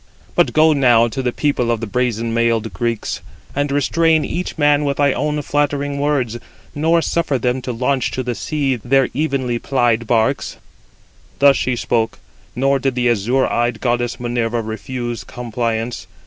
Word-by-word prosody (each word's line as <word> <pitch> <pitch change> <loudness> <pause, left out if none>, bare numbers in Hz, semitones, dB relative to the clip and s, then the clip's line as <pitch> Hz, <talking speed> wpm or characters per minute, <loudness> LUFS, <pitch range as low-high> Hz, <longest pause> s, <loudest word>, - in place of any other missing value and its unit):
But - - +3
go 155 0 +5
now 120 -5 +4
to 135 +4 -3
the 125 -1 0
people 135 -3 0
of 115 -1 +1
the 115 - -3
brazen 115 0 -1
mailed 115 -1 +1
Greeks, 115 -2 -2 0.3
and 145 0 0
restrain 160 +3 +2
each 180 0 -4
man 145 -1 +3
with 140 -1 -1
thy 140 -2 +3
own 150 +3 -1
flattering 145 -1 -1
words, 135 -5 0 0.3
nor 165 +3 +2
suffer 155 -5 0
them 125 +1 -1
to 125 - -4
launch 125 +3 0
to 130 - -2
the 125 0 -2
sea 140 0 -1
their 130 +3 +2
evenly 135 -4 -1
plied 120 -4 +1
91 115 - -10
barks." 115 +4 0 0.8
Thus 140 0 +6
she 130 - 0
spoke, 115 -1 -1 0.4
nor 135 +2 +2
did 135 -1 -1
the 125 -1 +2
azure 120 +5 +1
eyed 120 -1 0
goddess 120 -1 -1
Minerva 120 -1 -1
refuse 120 0 -5
compliance. 115 +1 -3
125 Hz, 165 wpm, -19 LUFS, 120-140 Hz, 0.8 s, Thus